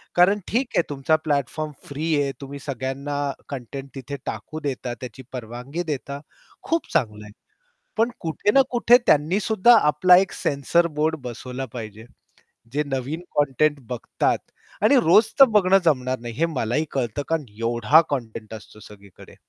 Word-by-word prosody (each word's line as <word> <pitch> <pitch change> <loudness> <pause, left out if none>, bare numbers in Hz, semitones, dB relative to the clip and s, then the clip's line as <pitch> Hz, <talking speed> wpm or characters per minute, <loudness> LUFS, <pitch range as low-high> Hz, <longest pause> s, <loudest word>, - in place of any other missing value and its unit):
कारण 190 +4 +5
ठीक 250 +4 0
आहे - - +5
तुमचा 145 +2 +1
प्लॅटफॉर्म 150 +1 -1 0.2
फ्री 155 +3 -1
आहे, 140 - -1
तुम्ही 140 +1 -8
सगळ्यांना 140 +1 -4 0.3
कंटेंट 135 +1 -7
तिथे 135 +1 -6
टाकू 155 - -5
देता, 130 -4 -4
त्याची 125 +2 -9
परवानगी 125 +7 -5
देता, 140 0 -5 0.4
खूप 330 0 -1
चांगलं 105 -5 0
आहे. 105 - -12 0.7
पण 225 +2 +3
कुठे 165 +5 0
ना 270 - +6
कुठे 240 0 +6
त्यांनीसुद्धा 195 +9 +4
आपला 180 +5 +6
एक 195 0 +2
सेन्सर 155 +5 +1
बोर्ड 160 +1 +2
बसवला 125 +2 -6
पाहिजे. 110 -2 -8 0.7
जे 150 +1 +1
नवीन 135 +4 -3 0.2
कंटेंट 145 +1 +2
बघतात 125 -2 -1 0.5
आणि 280 - +5
रोज 195 +7 +6
तर 275 - +11
बघणं 195 -1 +5
जमणार 130 -5 +1
नाही, 120 0 -7
हे 160 +8 +1
मलाही 145 -2 -1
कळतं. 125 -1 -2
कारण 160 -3 0 0.2
एवढा 120 +7 +4
कंटेंट 115 -5 -5
असतो 110 0 -13
सगळीकडे. 100 -2 -15
140 Hz, 150 wpm, -23 LUFS, 125-165 Hz, 0.7 s, तर